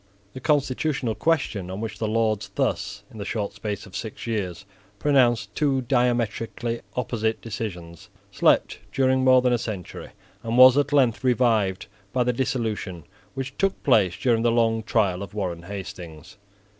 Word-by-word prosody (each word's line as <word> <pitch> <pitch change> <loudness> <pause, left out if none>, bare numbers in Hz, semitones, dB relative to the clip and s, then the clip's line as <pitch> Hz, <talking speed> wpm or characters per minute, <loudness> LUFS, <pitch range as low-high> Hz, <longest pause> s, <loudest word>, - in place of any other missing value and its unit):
The - - -7
constitutional 140 -3 0
question 115 - 0
on 95 +2 -5
which 105 -2 -5
the 110 - -1
Lords 110 -1 0
thus, - - -1
in 110 - -11
the - - -3
short 105 0 -3
space 105 0 -5
of 100 - -13
six 110 - -6
years, 100 -5 -3 0.3
pronounced 120 -6 +2
two 140 -3 +1
diametrically 120 -2 -1
opposite 110 -2 -1
decisions, 90 -7 -7 0.2
slept - - +2
during 130 -1 +2
more 130 -1 +6
than 125 -1 +3
a 120 - +1
century, 105 -6 -6 0.3
and 115 +1 -2
was 130 0 +9
at 145 0 +1
length 130 -5 +3
revived 115 -6 +2 0.3
by 125 - +2
the 125 0 +1
dissolution 110 - -2 0.3
which 135 0 -5
took 195 0 0
place 100 -10 +3
during 115 -3 +2
the 120 - +3
long 115 -1 +2
trial 100 -4 +1
of 100 +1 -8
Warren 90 -5 -3
Hastings. 90 -1 -9
115 Hz, 155 wpm, -24 LUFS, 100-130 Hz, 0.3 s, was